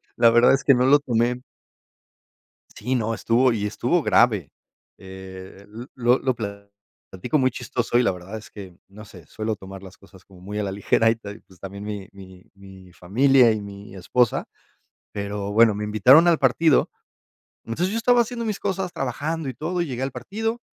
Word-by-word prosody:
La 115 Hz, -1 st, +5 dB
verdad 120 Hz, +2 st, +5 dB
es 135 Hz, -, 0 dB
que 140 Hz, -, +5 dB
no 125 Hz, 0 st, +2 dB
lo 145 Hz, -, +6 dB
tomé 120 Hz, -2 st, -1 dB, 1.3 s
Sí, 130 Hz, +1 st, -3 dB
no, 115 Hz, -2 st, -1 dB
estuvo 120 Hz, +2 st, +2 dB
y 105 Hz, -2 st, -2 dB
estuvo 120 Hz, +11 st, 0 dB
grave, 105 Hz, -, +2 dB, 0.5 s
eh, 95 Hz, 0 st, -11 dB
l 110 Hz, +4 st, -10 dB
lo 125 Hz, 0 st, +2 dB
lo 130 Hz, -2 st, -1 dB
pla 100 Hz, -2 st, -7 dB, 0.4 s
platico 115 Hz, +10 st, -2 dB
muy 130 Hz, -1 st, +2 dB
chistoso, 120 Hz, 0 st, -2 dB
y 125 Hz, -, +3 dB
la -, -, +2 dB
verdad 95 Hz, +4 st, -8 dB
es 110 Hz, -, -15 dB
que, 95 Hz, -4 st, -11 dB
no 105 Hz, +2 st, -13 dB
sé, 90 Hz, -6 st, -15 dB
suelo 110 Hz, 0 st, -4 dB
tomar 95 Hz, 0 st, -11 dB
las 95 Hz, -1 st, -13 dB
cosas 100 Hz, -1 st, -19 dB
como 95 Hz, -2 st, -18 dB
muy 105 Hz, +3 st, -7 dB
a 105 Hz, -, -1 dB
la 100 Hz, -, -3 dB
ligera 105 Hz, +3 st, +2 dB
y 115 Hz, -, -1 dB
todo, 105 Hz, -3 st, -10 dB
y, 105 Hz, -, -14 dB
pues, 95 Hz, -2 st, -22 dB
también 100 Hz, +1 st, -8 dB
mi 105 Hz, -2 st, -6 dB
mi 95 Hz, -2 st, -14 dB
mi 95 Hz, -2 st, -15 dB
familia 125 Hz, +7 st, +3 dB
y 110 Hz, -1 st, -2 dB
mi 100 Hz, 0 st, -11 dB
esposa. 120 Hz, +6 st, 0 dB, 0.7 s
Pero 100 Hz, 0 st, -5 dB
bueno, 110 Hz, 0 st, +4 dB
me 105 Hz, -, -4 dB
invitaron 125 Hz, -, +5 dB
al 170 Hz, -2 st, +4 dB
partido. 140 Hz, +3 st, +3 dB, 0.8 s
Entonces 170 Hz, +11 st, -2 dB
yo 225 Hz, -, -2 dB
estaba 240 Hz, +1 st, +3 dB
haciendo 235 Hz, 0 st, -4 dB
mis 210 Hz, -2 st, -3 dB
cosas, 190 Hz, -2 st, -3 dB
trabajando 145 Hz, +4 st, -3 dB
y -, -, -6 dB
todo, 175 Hz, +7 st, -3 dB
y -, -, -1 dB
llegué 130 Hz, -1 st, -4 dB
al 135 Hz, -, -3 dB
partido. 225 Hz, +3 st, -4 dB
115 Hz, 195 wpm, -23 LUFS, 100-130 Hz, 1.3 s, lo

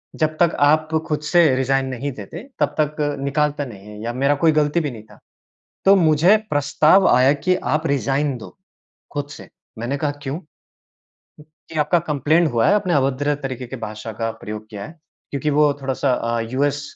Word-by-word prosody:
जब 155 Hz, -1 st, 0 dB
तक 170 Hz, -1 st, +3 dB
आप 155 Hz, +2 st, +3 dB, 0.2 s
खुद 150 Hz, -1 st, -1 dB
से 175 Hz, -1 st, +6 dB
रिज़ाइन 135 Hz, +1 st, +1 dB
नहीं 130 Hz, +2 st, -4 dB
देते 125 Hz, -, -9 dB, 0.2 s
तब -, -, 0 dB
तक 150 Hz, 0 st, +1 dB, 0.2 s
निकालता 145 Hz, +1 st, 0 dB
नहीं 105 Hz, -4 st, -11 dB
है 105 Hz, 0 st, -10 dB
या 120 Hz, +1 st, -3 dB
मेरा 140 Hz, +3 st, +2 dB
कोई 160 Hz, -, +6 dB
गलती 150 Hz, +2 st, +2 dB
भी 150 Hz, -4 st, -2 dB
नहीं 110 Hz, -3 st, -10 dB
था। -, -, -17 dB, 0.7 s
तो 195 Hz, +1 st, +7 dB
मुझे 170 Hz, +4 st, +4 dB
प्रस्ताव 150 Hz, +6 st, +3 dB
आया 130 Hz, +3 st, +5 dB
कि 165 Hz, +6 st, 0 dB, 0.2 s
आप 155 Hz, +1 st, 0 dB
रिज़ाइन 135 Hz, +1 st, 0 dB
दो 115 Hz, -, -12 dB, 0.6 s
खुद 145 Hz, 0 st, -3 dB
से। -, -, -11 dB, 0.3 s
मैंने 120 Hz, +5 st, -2 dB
कहा 150 Hz, -1 st, -1 dB
क्यों? 145 Hz, +5 st, -4 dB, 1.3 s
कि 160 Hz, -, -4 dB
आपका 150 Hz, +4 st, +3 dB
कंप्लेंट 155 Hz, +3 st, +2 dB
हुआ 115 Hz, -1 st, +2 dB
है, 205 Hz, -, +5 dB
आपने 185 Hz, -5 st, +1 dB
अभद्र 140 Hz, +1 st, +1 dB
तरीके 130 Hz, -2 st, -5 dB
की 130 Hz, -, -7 dB
भाषा 105 Hz, +1 st, -7 dB
का 115 Hz, +1 st, -3 dB
प्रयोग 105 Hz, +1 st, -7 dB
किया 100 Hz, -1 st, -7 dB
है। 160 Hz, -, -9 dB, 0.4 s
क्योंकि 145 Hz, +2 st, -1 dB
वो 150 Hz, 0 st, +4 dB
थोड़ा-सा 135 Hz, 0 st, 0 dB
अ, 115 Hz, -1 st, -1 dB
यूएस 145 Hz, +2 st, 0 dB
145 Hz, 185 wpm, -21 LUFS, 130-155 Hz, 1.3 s, तो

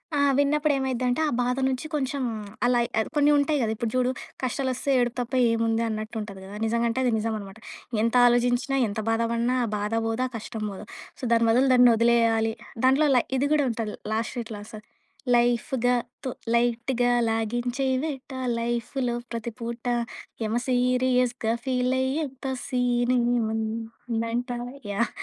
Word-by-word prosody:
ఆ! -, -, +1 dB, 0.2 s
విన్నప్పుడు 290 Hz, +1 st, +2 dB
ఏమైద్దంటే, 255 Hz, +1 st, 0 dB
ఆ -, -, -3 dB
బాధ 250 Hz, +1 st, +1 dB
నుంచి 260 Hz, +3 st, -2 dB
కొంచెం 275 Hz, -1 st, -1 dB, 0.4 s
అలా 245 Hz, 0 st, +3 dB, 0.2 s
ఆహ్, 220 Hz, -, 0 dB
కొన్ని 295 Hz, 0 st, +4 dB
ఉంటాయి 290 Hz, 0 st, +2 dB
గదా, 220 Hz, -2 st, 0 dB
ఇప్పుడు 220 Hz, 0 st, -3 dB
చూడు 255 Hz, 0 st, +2 dB, 0.3 s
కష్టాలు 260 Hz, +1 st, -1 dB
వస్తే 270 Hz, +3 st, -4 dB
ఏడుపు 245 Hz, 0 st, 0 dB
తప్ప 245 Hz, -, -6 dB, 0.2 s
ఏముంది 230 Hz, 0 st, +1 dB
అన్నట్టు 215 Hz, +1 st, -5 dB
ఉంటది 200 Hz, -2 st, -8 dB
గదా! 200 Hz, +2 st, -9 dB
నిజంగా 235 Hz, +1 st, +1 dB
అంటే 230 Hz, +3 st, -1 dB
అది 245 Hz, -, +2 dB
నిజం 220 Hz, +1 st, -1 dB
అనమాట. 195 Hz, 0 st, -10 dB, 0.5 s
ఎంత 230 Hz, +1 st, +1 dB
ఆలోచించినా 245 Hz, +3 st, +2 dB
ఎంత 205 Hz, +1 st, -4 dB
బాధ 225 Hz, 0 st, +1 dB
పడిన 235 Hz, +2 st, +1 dB
ఆ -, -, -3 dB
బాధ 210 Hz, +2 st, -3 dB
పోదు. 225 Hz, +2 st, -1 dB
ఆ -, -, -11 dB
కష్టం 220 Hz, 0 st, -6 dB
పోదు. 195 Hz, +2 st, -8 dB, 0.4 s
సో, -, -, -16 dB
దాని 230 Hz, 0 st, +4 dB
బదులు 255 Hz, +4 st, +4 dB
దాన్ని 250 Hz, -1 st, +7 dB
వదిలేయాలి 230 Hz, -1 st, +3 dB, 0.3 s
దాంట్లో 275 Hz, +4 st, +4 dB
లై 245 Hz, -, +4 dB
ఇది 280 Hz, +2 st, +1 dB
గూడా 295 Hz, -2 st, +3 dB
ఉంటది. 220 Hz, -2 st, -4 dB, 0.2 s
లాస్ట్‌లో 230 Hz, +2 st, -2 dB
ఇట్లా 215 Hz, -2 st, -7 dB
వస్తది. 215 Hz, 0 st, -11 dB, 0.5 s
లైఫ్‌గాతో 245 Hz, +1 st, 0 dB, 0.2 s
లైట్‌గా 240 Hz, +1 st, +1 dB, 0.2 s
లాగించేదెట్ట 250 Hz, +5 st, -1 dB, 0.3 s
లైఫ్‌లో 240 Hz, +2 st, -1 dB, 0.2 s
ప్రతి 235 Hz, 0 st, -4 dB
పూట 235 Hz, 0 st, -5 dB, 0.6 s
యమ 220 Hz, +1 st, -1 dB
సీరియస్‌గా 250 Hz, -2 st, +1 dB
ఫీల్ 255 Hz, -1 st, +1 dB
అయ్యేంత 270 Hz, 0 st, -2 dB, 0.2 s
సీన్ 245 Hz, -1 st, +1 dB, 0.2 s
ఏముందంట. 230 Hz, +1 st, -2 dB, 0.4 s
యాహ్! 235 Hz, +4 st, 0 dB
240 Hz, 150 wpm, -26 LUFS, 225-255 Hz, 0.6 s, దాన్ని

